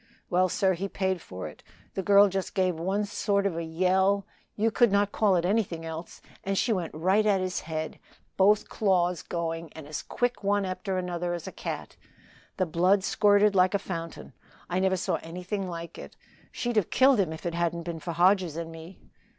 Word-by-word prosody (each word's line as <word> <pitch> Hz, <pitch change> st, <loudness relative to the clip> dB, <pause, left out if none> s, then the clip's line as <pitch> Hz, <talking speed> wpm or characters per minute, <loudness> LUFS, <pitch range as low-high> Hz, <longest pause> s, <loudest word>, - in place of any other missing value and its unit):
Well, 185 Hz, +1 st, +3 dB
sir, 190 Hz, +2 st, +2 dB
he 195 Hz, +3 st, -4 dB
paid 190 Hz, -3 st, -1 dB
for 95 Hz, -, -7 dB
it. 75 Hz, -, -12 dB, 0.3 s
The 195 Hz, -, -2 dB
girl 200 Hz, +1 st, +6 dB
just 195 Hz, -1 st, -3 dB
gave 185 Hz, -1 st, +2 dB
one 195 Hz, +5 st, 0 dB
sort 200 Hz, -1 st, 0 dB
of 195 Hz, -4 st, 0 dB
a 170 Hz, -, -3 dB
yell 190 Hz, +4 st, +2 dB, 0.3 s
you 225 Hz, +2 st, +1 dB
could 240 Hz, -1 st, +4 dB
not 200 Hz, 0 st, +2 dB
call 205 Hz, -4 st, +3 dB
it 175 Hz, -1 st, +1 dB
anything 180 Hz, -5 st, 0 dB
else 160 Hz, +1 st, -7 dB, 0.2 s
and 195 Hz, 0 st, -1 dB
she 230 Hz, -, +2 dB
went 175 Hz, -6 st, -3 dB
right 190 Hz, +7 st, +2 dB
at 205 Hz, -2 st, +3 dB
his 185 Hz, 0 st, -2 dB
head, 155 Hz, -1 st, -5 dB, 0.4 s
both 205 Hz, +2 st, +4 dB
claws 180 Hz, -4 st, +1 dB
going 165 Hz, -1 st, -4 dB
and 160 Hz, -, -9 dB
as 150 Hz, -, -4 dB
quick 245 Hz, -2 st, -2 dB
one 200 Hz, 0 st, +1 dB
after 185 Hz, +1 st, -3 dB
another 175 Hz, -1 st, -2 dB
as 170 Hz, -, -7 dB
a -, -, -6 dB
cat. -, -, -6 dB, 0.6 s
The 185 Hz, -, +2 dB
blood 180 Hz, +4 st, +2 dB
squirted 205 Hz, 0 st, +4 dB
like 185 Hz, +1 st, +4 dB
a -, -, +5 dB
fountain 165 Hz, -4 st, -7 dB, 0.4 s
I 180 Hz, -, +1 dB
never 190 Hz, 0 st, +2 dB
saw 180 Hz, -, -1 dB
anything 180 Hz, +3 st, -4 dB
like 170 Hz, -1 st, -7 dB
it. -, -, -10 dB, 0.4 s
She'd 240 Hz, -2 st, -2 dB
have 205 Hz, -, +2 dB
killed 265 Hz, -2 st, +5 dB
him 180 Hz, -5 st, +1 dB
if 160 Hz, -, -8 dB
it 170 Hz, -, -1 dB
hadn't 170 Hz, 0 st, -1 dB
been 165 Hz, -1 st, -5 dB
for 170 Hz, +2 st, -5 dB
Hodges 180 Hz, -1 st, +3 dB
and 165 Hz, -1 st, -5 dB
me." 165 Hz, +3 st, -11 dB
185 Hz, 200 wpm, -27 LUFS, 170-200 Hz, 0.6 s, girl